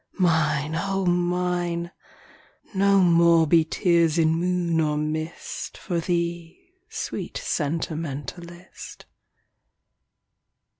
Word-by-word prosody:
Mine, 160 Hz, -4 st, +1 dB
O 195 Hz, +2 st, -1 dB
Mine! 175 Hz, -1 st, 0 dB, 0.8 s
No 195 Hz, 0 st, +4 dB
more 170 Hz, -2 st, +5 dB
be 165 Hz, +1 st, +4 dB
tears 170 Hz, -1 st, +2 dB
in 160 Hz, -1 st, +3 dB
moon 175 Hz, -1 st, 0 dB
or 150 Hz, -1 st, 0 dB
mist 155 Hz, +2 st, -4 dB
For 175 Hz, -3 st, -3 dB
thee, 170 Hz, -, -3 dB, 0.2 s
sweet 445 Hz, -, -5 dB
sentimentalist. 165 Hz, +2 st, -5 dB
170 Hz, 85 wpm, -24 LUFS, 160-180 Hz, 0.8 s, more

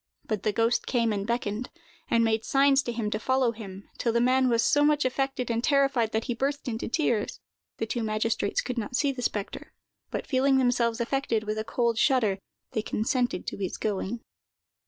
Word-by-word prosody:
But 215 Hz, -4 st, -2 dB
the 215 Hz, -, +1 dB
ghost 230 Hz, +3 st, +1 dB
came 230 Hz, -3 st, +1 dB
and 200 Hz, 0 st, -3 dB
beckoned, 235 Hz, 0 st, -2 dB, 0.4 s
and 230 Hz, 0 st, +3 dB
made 225 Hz, -1 st, +1 dB
signs 275 Hz, 0 st, +4 dB
to 240 Hz, -, -4 dB
him 225 Hz, -3 st, -2 dB
to 215 Hz, -, -1 dB
follow 260 Hz, 0 st, +2 dB
him, 200 Hz, -3 st, -9 dB
till 235 Hz, -, +1 dB
the 235 Hz, -, +2 dB
man 255 Hz, +1 st, +3 dB
was 230 Hz, -1 st, +3 dB
so 290 Hz, +5 st, +4 dB
much 295 Hz, -1 st, +3 dB
affected 255 Hz, -1 st, -1 dB
and 230 Hz, +1 st, -1 dB
terrified 275 Hz, -6 st, +2 dB
that 220 Hz, 0 st, 0 dB
he 245 Hz, -, -2 dB
burst 275 Hz, +4 st, -2 dB
into 225 Hz, -2 st, -3 dB
tears. 235 Hz, -5 st, 0 dB, 0.4 s
The -, -, -1 dB
two 235 Hz, +2 st, -2 dB
magistrates 215 Hz, -1 st, 0 dB
could 250 Hz, -1 st, -3 dB
not 225 Hz, +2 st, -4 dB
see 285 Hz, +1 st, +2 dB
the 260 Hz, -2 st, -6 dB
spectre, 205 Hz, -4 st, -4 dB, 0.4 s
but -, -, -4 dB
feeling 270 Hz, 0 st, +3 dB
themselves 245 Hz, -2 st, +2 dB
affected 235 Hz, -3 st, 0 dB
with 215 Hz, 0 st, -2 dB
a -, -, -1 dB
cold 235 Hz, 0 st, 0 dB
shudder, 225 Hz, -8 st, +3 dB, 0.3 s
they 220 Hz, -, -1 dB
consented 245 Hz, -1 st, -1 dB
to -, -, -4 dB
his 190 Hz, -2 st, -3 dB
going. 210 Hz, +2 st, -2 dB
235 Hz, 200 wpm, -27 LUFS, 220-260 Hz, 0.4 s, signs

